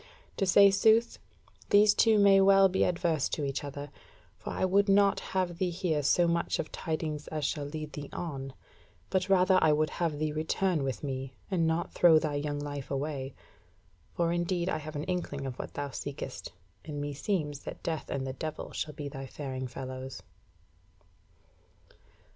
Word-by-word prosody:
To 195 - +1
say 200 +2 +7
sooth, 220 +4 +3 0.5
these 205 +1 +6
two 220 0 +4
may 200 -1 +6
well 195 0 +6
be 190 0 +1
adverse 170 -4 0
to 150 - -2
each 135 0 -3
other, 145 0 -7 0.4
for - - -8
I - - 0
would 200 +2 +3
not 200 0 +4
have 180 -3 -2
thee 185 - +1
hear 170 -3 -1
so 170 +5 +3
much 170 0 0
of 155 - -4
tidings 155 -2 -3
as 155 -2 -3
shall 145 0 -2
lead 155 +1 -6
thee 145 -1 -7
on, 135 -6 -5 0.6
but 190 0 0
rather 185 0 +5
I 155 - +5
would 155 0 +1
have 165 -4 -1
thee 155 0 -1
return 160 +2 0
with 135 0 -3
me, 130 -2 -4 0.2
and 170 -4 +2
not 165 +1 -1
throw 170 -3 +6
thy 155 -1 0
young 145 0 -2
life 145 -1 -5
away: 135 -1 -3 0.8
for 170 -1 +1
indeed 175 +1 -1
I 155 - -1
have 155 0 -8
an 145 - -3
inkling 165 -6 -3
of 130 -1 -6
what - - -7
thou 145 -1 -3
seekest, 135 -2 -6 0.3
and 150 -2 -6
meseems 145 +1 -2
that - - -8
Death 160 -2 -3
and 135 -1 -2
the 130 - -4
Devil 155 +2 -6
shall 150 -2 -4
be 145 -1 -5
thy 135 -1 -7
faring 130 -2 -5
fellows." 130 +1 -7
155 Hz, 175 wpm, -30 LUFS, 145-180 Hz, 0.8 s, say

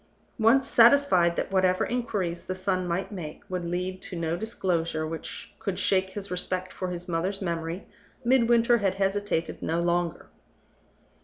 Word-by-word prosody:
Once 235 +5 +4
satisfied 230 -9 +5
that - - -2
whatever 185 -1 +3
inquiries 205 -8 -2
the 185 - -2
son 185 -1 -1
might 180 +4 -2
make 165 -7 -7
would 180 -1 -3
lead 180 +2 -3
to - - -7
no 165 0 -1
disclosure 170 -6 -1
which 165 +5 -7
could 195 -3 -3
shake 190 -1 +2
his 200 0 -6
respect 185 +1 -3
for 185 - -4
his 180 0 -6
mother's 180 +3 -1
memory, 170 -1 -3 0.4
Midwinter 235 -1 +4
had 195 -2 +1
hesitated 195 -3 -1
no 165 +1 0
longer. 175 -1 0
185 Hz, 150 wpm, -27 LUFS, 170-205 Hz, 0.4 s, satisfied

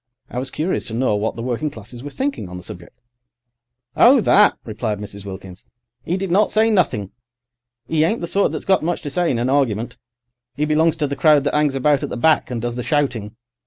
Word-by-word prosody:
I 125 - -3
was 130 +1 -3
curious 165 +8 -2
to 110 - -6
know 120 -3 +1
what 105 +2 -2
the 115 - -6
working 125 +5 -2
classes 120 0 -10
were 145 - -7
thinking 265 - -3
on 90 - -7
the 90 - -10
subject. 90 -1 -11 1.0
"Oh, 260 +3 +6
that," 210 0 +4
replied 110 -1 -3
Mrs. 100 -1 -9
Wilkins, 95 -1 -9 0.4
"'e 175 - 0
did 195 -2 -3
not 205 +4 +3
say 220 +1 +3
nothing. 140 - 0 0.8
'E 155 +2 +2
ain't 215 +8 +1
the - - -2
sort 195 +4 +1
that's - - -5
got 190 -1 +3
much 175 +2 -2
to 145 - -5
say 175 +4 0
in 125 - 0
an 120 +2 0
argument. 120 -5 0 0.6
'E 150 - +1
belongs 155 +1 +2
to 155 -2 -1
the 140 - -3
crowd 150 -2 +4
that 145 - -1
'angs 150 -2 +2
about 140 +1 +2
at - - -3
the - - -5
back, 160 +5 +2
and 120 -2 -4
does 120 0 -2
the - - -2
shouting. 125 -8 -1
140 Hz, 225 wpm, -20 LUFS, 115-165 Hz, 1.0 s, Oh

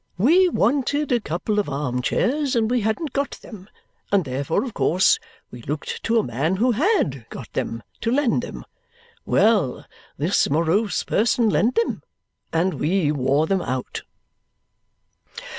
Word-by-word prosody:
We 340 - +5
wanted 285 - 0
a 245 - +3
couple 210 +3 -2
of 200 - -1
arm 135 -3 -2
chairs, 275 - 0
and 225 -1 +1
we 250 -1 +2
hadn't 220 +8 -2
got 280 0 -2
them, 200 -3 -11 0.4
and 195 -4 +3
therefore 135 +4 -1
of 250 -5 -6
course 185 +3 +3 0.3
we 120 - -10
looked 145 +5 -5
to 230 +1 +2
a 220 - +3
man 155 +10 -1
who 245 +6 +2
HAD 235 - 0
got - - -9
them, 115 0 -3 0.2
to 230 - -1
lend 255 -3 +2
them. - - -8 0.6
Well! 205 - +2 0.3
This 165 +8 +1
morose 170 +8 +1
person 225 0 +2
lent 195 +11 +2
them, 460 - 0 0.5
and 175 +3 +1
we 160 -1 +1
wore 140 +1 +1
them 190 +2 0
out. 130 -4 -4
200 Hz, 150 wpm, -22 LUFS, 150-245 Hz, 0.6 s, We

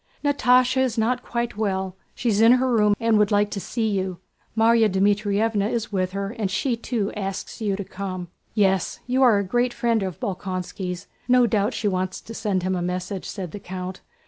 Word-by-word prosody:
"Natásha 255 -2 +4
is 255 -3 0
not 245 +3 +1
quite 235 -3 -3
well; 190 -3 -1 0.2
she's 225 -3 +1
in 230 +2 +8
her 255 0 +2
room 210 -3 +4
and 230 -2 +3
would 210 -1 +4
like 205 0 +2
to 200 - -3
see 225 +3 -2
you. 190 -3 -1 0.4
Márya 225 0 +5
Dmítrievna 205 +2 +1
is 230 -2 -2
with 185 -2 -1
her 200 0 -3
and 205 -3 0
she 235 +6 0
too 225 -3 -2
asks 195 +2 -5
you 205 -3 0
to 200 - -4
come." 185 -2 -5 0.3
"Yes, 195 -4 +2
you 255 +2 +1
are 240 -5 +6
a 200 - +1
great 240 +5 0
friend 235 -2 +1
of 185 -4 -4
Bolkónski's, 185 -1 -4 0.2
no 250 -1 +5
doubt 215 +1 +1
she 215 - -1
wants 185 -1 -1
to 225 - -10
send 200 -5 -1
him 185 0 0
a 180 - -2
message," 180 +2 -3
said 185 -5 -5
the 205 - -7
count. 185 0 -6
205 Hz, 200 wpm, -24 LUFS, 190-230 Hz, 0.4 s, in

